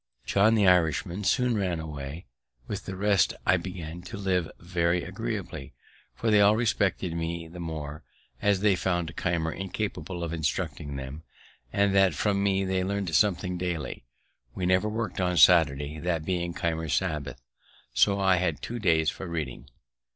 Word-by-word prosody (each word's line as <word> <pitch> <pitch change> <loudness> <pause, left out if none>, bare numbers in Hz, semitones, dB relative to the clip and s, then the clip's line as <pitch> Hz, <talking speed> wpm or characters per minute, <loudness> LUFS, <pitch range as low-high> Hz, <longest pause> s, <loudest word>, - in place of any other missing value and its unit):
John, 105 +3 +4
the 105 -2 +3
Irishman, 90 +1 +2
soon 125 0 +2
ran 95 -5 -1
away; 75 0 -6 0.4
with - - -5
the 95 - -4
rest 100 -2 +2
I 95 - +4
began 90 -2 -6
to 105 +5 -8
live 95 -4 0
very 85 0 0
agreeably, - - -5 0.4
for 115 - 0
they 105 -1 +6
all 100 +1 +6
respected 100 -6 0
me 85 0 -3
the 85 +2 -10
more, 80 -3 -5 0.4
as 100 -2 +2
they 105 -2 +4
found 85 -3 -1
Keimer 85 -2 -1
incapable 95 -2 -4
of 85 -1 -3
instructing 75 -2 -2
them, 70 +3 -6 0.5
and 100 -1 +2
that 95 -4 +4
from 100 +4 +1
me 95 -1 +1
they 95 -1 0
learned 100 -3 -2
something 90 -2 +2
daily. 90 -7 -3 0.5
We 90 - -2
never 95 +3 +3
worked 110 -3 -3
on 90 -1 +1
Saturday, 75 -3 +5
that 85 -2 -1
being 85 -1 -2
Keimer's 80 -2 -1
Sabbath, 75 -9 -2 0.5
so 100 -1 +3
I 95 -1 +4
had 90 +1 0
two 120 +1 -4
days 80 -6 +3
for 95 - -7
reading. 75 -5 -5
90 Hz, 160 wpm, -27 LUFS, 80-100 Hz, 0.5 s, they